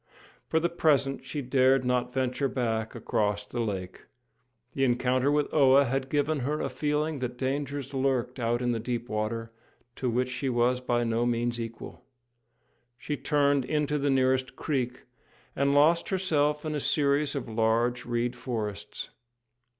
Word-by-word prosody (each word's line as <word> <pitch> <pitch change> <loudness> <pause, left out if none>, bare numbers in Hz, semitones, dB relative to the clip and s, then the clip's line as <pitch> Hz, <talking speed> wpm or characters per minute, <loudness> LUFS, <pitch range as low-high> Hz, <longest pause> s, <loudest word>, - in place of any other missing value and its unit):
For 160 - +2
the 170 - +1
present 145 -5 +1
she 140 +2 -4
dared 130 0 +3
not 125 0 0
venture 130 +2 0
back 115 -4 -2
across 105 -1 -1
the 120 - -5
lake. 95 -5 -4 0.7
The 135 - 0
encounter 130 +2 +2
with 150 0 0
Oa 140 -2 +6
had 135 +1 -2
given 145 +1 +1
her 145 +4 -1
a - - -2
feeling 150 0 -1
that 125 -1 -4
dangers 140 +1 -3
lurked 130 -1 0
out 120 +1 0
in 120 - +1
the 115 - -1
deep 120 +1 -3
water, 115 +2 -2 0.5
to 130 - -1
which 125 +2 0
she 130 +2 -2
was 125 +1 +2
by 120 -1 0
no 115 +1 0
means 120 0 -1
equal. 115 0 -7 0.9
She 150 +4 -3
turned 145 -2 +2
into 150 +2 0
the 140 +1 +1
nearest 130 -1 +2
creek, 130 -4 -2 0.5
and 140 +1 +2
lost 160 +4 +4
herself 150 -6 +1
in 155 - -2
a 150 - -1
series 145 0 +1
of 135 -4 -3
large 115 +2 +1
reed 120 +1 -1
forests. 110 -5 -5
130 Hz, 160 wpm, -28 LUFS, 120-145 Hz, 0.9 s, Oa